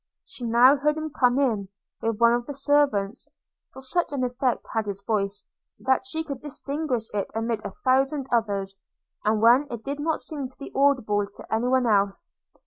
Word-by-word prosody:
She 260 -10 -8
now 245 +5 +6
heard 300 +2 +1
him 315 0 -4
come 250 -2 +2
in, 220 -8 +1 0.3
with 225 -1 -1
one 235 0 +6
of 240 0 -1
the 285 - -5
servants; 275 -7 +1 0.4
for 265 - -11
such 345 +6 -1
an 275 -3 -1
effect 250 0 -1
had 220 -2 -1
his 200 -1 -5
voice, 200 -2 -1 0.3
that 260 0 +1
she 320 +4 -2
could 280 -5 -6
distinguish 280 -4 -3
it 200 -2 -2
amid 225 -1 -2
a - - -4
thousand 270 +2 +1
others, 200 -4 -1 0.4
and 215 +1 +1
when 250 +5 +6
it 235 -2 -6
did 280 +1 -4
not 315 +2 0
seem 285 -4 -5
to 260 - -23
be 280 - -9
audible 250 -8 +2
to 205 - -10
any 225 +3 +1
one 255 0 +3
else. 200 -3 +1
250 Hz, 190 wpm, -25 LUFS, 220-280 Hz, 0.4 s, now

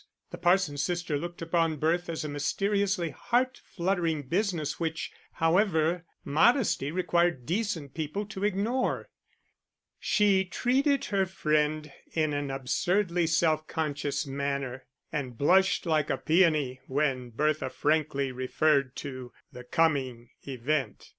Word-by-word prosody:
The - - -7
parson's 175 -5 +2
sister 175 -1 -1
looked 175 +3 -5
upon 165 -1 +1
birth 170 +4 0
as 160 -2 -3
a - - -2
mysteriously 190 +4 0
heart 250 - 0
fluttering 170 -4 -1
business, 165 -1 -1
which, 160 -1 -3 0.2
however, 165 -1 +2 0.2
modesty 180 - +3
required 175 -5 +1
decent 170 - -2
people 160 +6 -3
to 195 -1 -7
ignore. 210 +6 0 0.9
She 205 -3 +3
treated 265 - +1
her 195 -1 +2
friend 155 -3 0 0.2
in 155 -2 +1
an 145 -1 -2
absurdly 170 +7 0
self 160 -1 +2
conscious 145 -2 -2
manner, 140 -2 -3 0.3
and 130 -5 -4
blushed 190 +9 +3
like 155 -3 +1
a - - +1
peony 155 -6 +2
when 130 -3 0
Bertha 150 +3 0
frankly 145 -2 0
referred 130 +1 +1
to 130 -3 -7 0.2
the 125 -2 -10
coming 130 -5 0 0.2
event. 135 -2 -2
155 Hz, 120 wpm, -28 LUFS, 140-180 Hz, 0.9 s, modesty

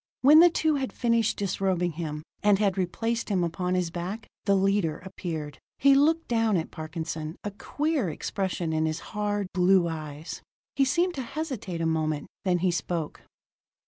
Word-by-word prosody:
When 295 +4 +8
the 350 +1 +8
two 315 -2 +1
had 265 -2 -2
finished 230 -2 +1
disrobing 185 -3 0
him, 155 -2 -5 0.2
and 205 -1 +4
had 200 -2 +1
replaced 225 +6 -1
him 190 -4 +1
upon 180 +2 -1
his 180 -2 0
back, 180 +6 -5 0.2
the 200 -2 +4
leader 195 -4 +2
appeared. 160 -5 -6 0.2
He 275 +1 +6
looked 315 +4 +3
down 225 -4 +2
at 165 - -3
Parkinson, 160 0 -5
a 205 - -3
queer 290 - -1
expression 175 0 -2
in 160 0 +1
his 155 +1 -2
hard, 205 -1 -1
blue 180 -1 +4
eyes. 155 -1 -6 0.3
He 275 - +4
seemed 345 +7 +1
to 270 - -4
hesitate 250 - -4
a - - 0
moment: 155 -2 -1 0.2
then 180 -2 +3
he 180 - +4
spoke. 170 -2 -3
190 Hz, 170 wpm, -27 LUFS, 165-230 Hz, 0.3 s, When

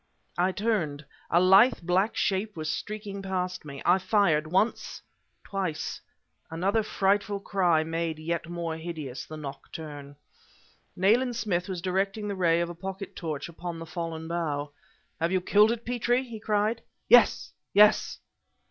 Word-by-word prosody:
I 180 +2 +3
turned. 180 -9 -1 0.2
A 170 - +4
lithe 195 +7 +6
black 185 +5 +1
shape 200 0 -1
was 155 -1 -2
streaking 205 0 -5
past 185 -3 -3
me. 140 -2 -8
I 180 +2 +5
fired 185 -6 +2
once 195 +5 0 0.4
twice. 190 -6 -3 0.5
Another 190 +7 +1
frightful 200 0 0
cry 180 -5 +2
made 165 0 -2
yet 165 +1 -3
more 170 -2 -3
hideous 155 -6 -6
the 155 - -8
nocturne. 145 0 -8 0.8
Nayland 235 +6 +3
Smith 190 -4 -1
was 180 -2 -4
directing 195 +3 -1
the 200 - -2
ray 170 -2 +3
of 170 - -2
a - - -5
pocket 190 +3 -7
torch 155 -4 -4
upon 170 0 -6
the 165 - -7
fallen 165 -1 -5
bough. 150 -4 -2 0.5
"Have 165 +1 0
you 190 - +2
killed 210 +4 +4
it, 235 0 -4
Petrie?" 245 +1 +1
he 235 -4 -8
cried. 215 +1 0 0.3
"Yes, 245 -2 +5 0.2
yes!" 210 +1 +5
180 Hz, 150 wpm, -27 LUFS, 165-205 Hz, 0.8 s, lithe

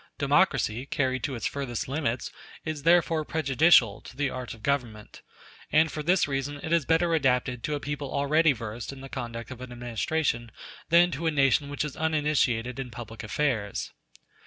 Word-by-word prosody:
Democracy, 120 +5 +2
carried 130 -3 0
to 135 - -2
its 115 - -5
furthest 135 -5 -3
limits, 130 -4 -2 0.3
is 155 -2 -3
therefore 165 0 +3
prejudicial 140 -7 +4
to 125 - -13
the 140 -1 0
art 130 -1 -6
of 110 - -19
government; 120 -7 -2 0.5
and 160 +1 +4
for 155 - -4
this 175 +3 +2
reason 140 +1 -3
it 160 - -1
is 165 -5 +2
better 165 +1 +3
adapted 125 -4 +1
to 150 - -2
a - - -3
people 145 0 -4
already 150 +3 +3
versed 115 -1 -5
in 135 -1 -10
the 135 - -8
conduct 115 -2 -6
of 125 -1 -8
an 130 -1 -8
administration 120 +1 -2 0.4
than 175 +2 +5
to 165 +2 -2
a - - +5
nation 140 0 +2
which 145 +1 -2
is 150 - -6
uninitiated 145 -6 0
in 130 -2 -4
public 115 -1 -8
affairs. 110 -4 -1
135 Hz, 180 wpm, -27 LUFS, 120-155 Hz, 0.5 s, than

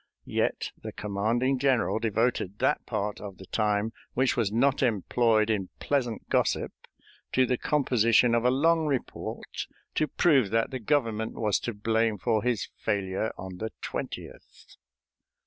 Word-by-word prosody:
Yet - - -1
the - - -6
commanding 115 +6 0
general 130 -4 +2
devoted 110 -3 0
that - - +1
part 105 -1 -2
of 100 -3 -8
the 95 - -11
time 105 +1 0 0.2
which 130 +1 +2
was 115 -5 +1
not 135 +5 +2
employed 115 -1 +2
in 95 -4 -1
pleasant 125 -6 -1
gossip - - +1 0.6
to 130 - +4
the 125 - +1
composition 120 -4 +3
of 115 0 +2
a 125 - +4
long 160 +4 +3
report 135 -4 -4 0.3
to 155 - +1
prove 135 - +3
that 115 +4 +1
the 130 - -3
Government 115 -3 0
was 105 -3 +1
to 120 - -4
blame 110 +1 +1
for 110 +2 +1
his 120 -3 0
failure 100 +1 -1
on 95 -1 -7
the 110 +3 -3
20th. - - -7
115 Hz, 145 wpm, -28 LUFS, 105-125 Hz, 0.6 s, to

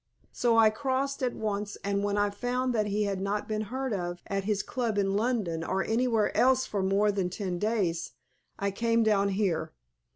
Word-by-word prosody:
So 235 -2 +2
I 220 -1 +6
crossed 275 +4 -1
at 250 -2 0
once, 205 -1 -3
and 200 0 0
when 205 0 0
I 205 0 +2
found 250 +4 -1
that 215 -2 +1
he 210 +1 0
had 195 -2 -2
not 200 +1 -2
been 215 -1 -1
heard 260 -1 -2
of 175 -2 -4
at 195 -1 -2
his 205 -1 0
club 235 -5 -2
in 195 -1 +1
London 205 -8 0
or 190 +3 0
anywhere 225 -2 +1
else 260 +1 +4
for 200 - -2
more 200 +2 +2
than 195 -3 -1
ten 185 -2 -3
days, 195 - -1 0.4
I 200 0 -1
came 230 +3 +2
down 200 -2 +3
here. 185 -6 -1
205 Hz, 195 wpm, -29 LUFS, 195-230 Hz, 0.4 s, I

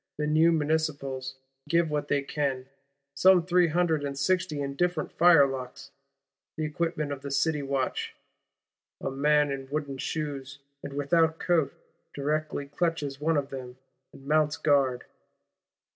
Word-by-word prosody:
The 150 - -1
new 155 +2 +4
Municipals 145 -4 -1 0.3
give 170 -2 +2
what 150 -1 -1
they 140 -1 +1
can; 135 -3 -2 0.5
some 185 +1 +5
three 180 -1 +4
hundred 165 -2 +1
and 140 -1 -4
sixty 175 0 0
indifferent 150 +4 -1
firelocks, 140 -5 +3 0.7
the 155 - -1
equipment 150 -1 -2
of 140 -1 -5
the 140 - -6
City 150 +2 +1
Watch: 135 -2 -2 0.8
"a - - -3
man 145 +1 +2
in 135 -1 -5
wooden 140 -2 -3
shoes, 140 -3 -4 0.2
and 140 - -7
without 160 +3 +2
coat, 160 -6 +1 0.4
directly 150 0 -2
clutches 145 -2 -2
one 160 +1 +2
of 140 -1 -1
them, 130 -2 -8 0.3
and 135 - -15
mounts 150 0 +2
guard." 135 -4 +2
145 Hz, 135 wpm, -28 LUFS, 140-160 Hz, 0.8 s, some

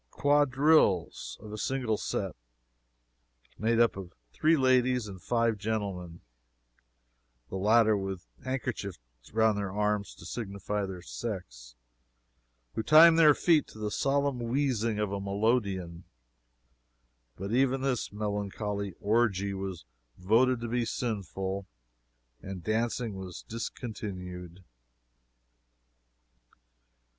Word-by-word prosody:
quadrilles, 145 - +3
of 105 0 -9
a 105 - -5
single 125 -4 0
set, - - -3 1.2
made 115 +2 +2
up 115 -2 +4
of 95 -2 -9 0.2
three 160 +1 +3
ladies 130 -3 +3
and 95 -3 -9
five 115 -1 +1
gentlemen, 100 -5 -3 1.3
(the - - -6
latter 110 +3 +4
with 95 -2 -4 0.2
handkerchiefs 130 -7 -3 0.3
around 110 -1 +3
their 100 -2 -2
arms 105 0 -1
to - - -13
signify 100 -2 -3
their 90 -2 -7
sex.) - - -6 1.0
who - - -1
timed 160 +6 +8
their 150 -3 +7
feet 160 -5 +3
to - - -14
the 105 -1 -3
solemn 140 0 +1
wheezing 120 -3 0
of 105 -2 -1
a 100 -1 -3
melodeon; 100 -4 0 1.3
but 100 +2 -5
even 130 +2 +2
this 130 -3 -1
melancholy 105 -1 -3
orgie 100 -2 +1
was 95 -7 -5 0.3
voted 115 +7 +3
to 120 - -4
be 120 +1 0
sinful, 100 -4 -3 0.7
and 95 -3 -7
dancing 115 +2 -1
was 95 -2 -8
discontinued. 95 -6 -6
105 Hz, 110 wpm, -29 LUFS, 95-125 Hz, 1.3 s, timed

